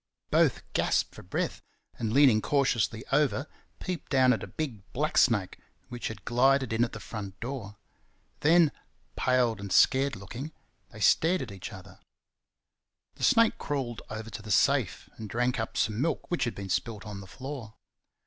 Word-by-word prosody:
Both -, -, +3 dB
gasped -, -, +1 dB
for -, -, -11 dB
breath, -, -, -3 dB, 0.4 s
and 110 Hz, -2 st, -1 dB
leaning 130 Hz, -4 st, +5 dB
cautiously 120 Hz, -5 st, +1 dB
over 140 Hz, -1 st, +2 dB, 0.3 s
peeped 180 Hz, -2 st, -5 dB
down 130 Hz, -2 st, +5 dB
at 115 Hz, -, -3 dB
a -, -, -6 dB
big 135 Hz, -10 st, -4 dB
black 150 Hz, +4 st, -1 dB
snake 105 Hz, -7 st, +3 dB, 0.3 s
which 120 Hz, -1 st, -4 dB
had 110 Hz, -4 st, -8 dB
glided 130 Hz, 0 st, +3 dB
in 115 Hz, +1 st, +3 dB
at 120 Hz, -, -2 dB
the 105 Hz, -, -6 dB
front 100 Hz, -1 st, -7 dB
door. 115 Hz, -5 st, -6 dB, 0.6 s
Then, 165 Hz, 0 st, +5 dB, 0.4 s
pale 125 Hz, -2 st, +2 dB
and 100 Hz, -1 st, -7 dB
scared 135 Hz, +6 st, +4 dB
looking, 125 Hz, +10 st, -7 dB, 0.4 s
they -, -, -12 dB
stared 180 Hz, +3 st, +4 dB
across 115 Hz, -, -6 dB
at -, -, -8 dB
each 95 Hz, -, -7 dB
other. 95 Hz, -1 st, -12 dB, 1.1 s
The -, -, -10 dB
snake 230 Hz, 0 st, +4 dB
crawled 130 Hz, -5 st, -3 dB
over 110 Hz, +1 st, -6 dB
to 105 Hz, -, -7 dB
the 110 Hz, -, -10 dB
safe 100 Hz, -, +2 dB
and 110 Hz, -2 st, -7 dB
drank 125 Hz, +2 st, 0 dB
up 110 Hz, -, -3 dB
some 110 Hz, +2 st, 0 dB
milk 165 Hz, +3 st, -2 dB
which 175 Hz, -, +1 dB
had 120 Hz, -, -3 dB
been 100 Hz, -1 st, -6 dB
spilt 100 Hz, +4 st, -2 dB
on 105 Hz, -2 st, -6 dB
the 95 Hz, -, -11 dB
floor. 130 Hz, -1 st, -8 dB
120 Hz, 175 wpm, -29 LUFS, 105-135 Hz, 1.1 s, leaning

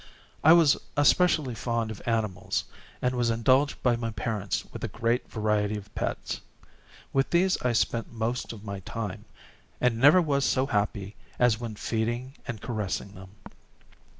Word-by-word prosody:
I 160 Hz, -, +8 dB
was 165 Hz, -4 st, +6 dB, 0.2 s
especially 145 Hz, -2 st, +4 dB
fond 115 Hz, 0 st, -2 dB
of 110 Hz, -, -8 dB
animals, 110 Hz, -5 st, -1 dB, 0.4 s
and 125 Hz, 0 st, +2 dB
was 120 Hz, -2 st, +1 dB
indulged 130 Hz, +5 st, +2 dB
by 125 Hz, -2 st, +4 dB
my 115 Hz, -1 st, -3 dB
parents 100 Hz, -3 st, -2 dB
with -, -, -7 dB
a -, -, 0 dB
great 115 Hz, +2 st, -1 dB
variety 105 Hz, -1 st, 0 dB
of 105 Hz, 0 st, -11 dB
pets. -, -, -3 dB, 0.7 s
With 135 Hz, 0 st, +2 dB
these 185 Hz, +2 st, +2 dB
I 125 Hz, -1 st, +1 dB
spent 115 Hz, 0 st, 0 dB
most 115 Hz, +2 st, -2 dB
of 110 Hz, -3 st, -10 dB
my 100 Hz, -2 st, -5 dB
time, 100 Hz, 0 st, -5 dB, 0.5 s
and 120 Hz, -2 st, +1 dB
never 145 Hz, +8 st, +7 dB
was 145 Hz, -5 st, +1 dB
so 130 Hz, 0 st, +2 dB
happy 105 Hz, -3 st, -1 dB, 0.2 s
as 120 Hz, -3 st, +3 dB
when 115 Hz, -3 st, -5 dB
feeding 120 Hz, +5 st, -2 dB
and 115 Hz, -2 st, -4 dB
caressing 105 Hz, -3 st, -3 dB
them. 95 Hz, 0 st, -11 dB
115 Hz, 155 wpm, -27 LUFS, 105-130 Hz, 0.7 s, I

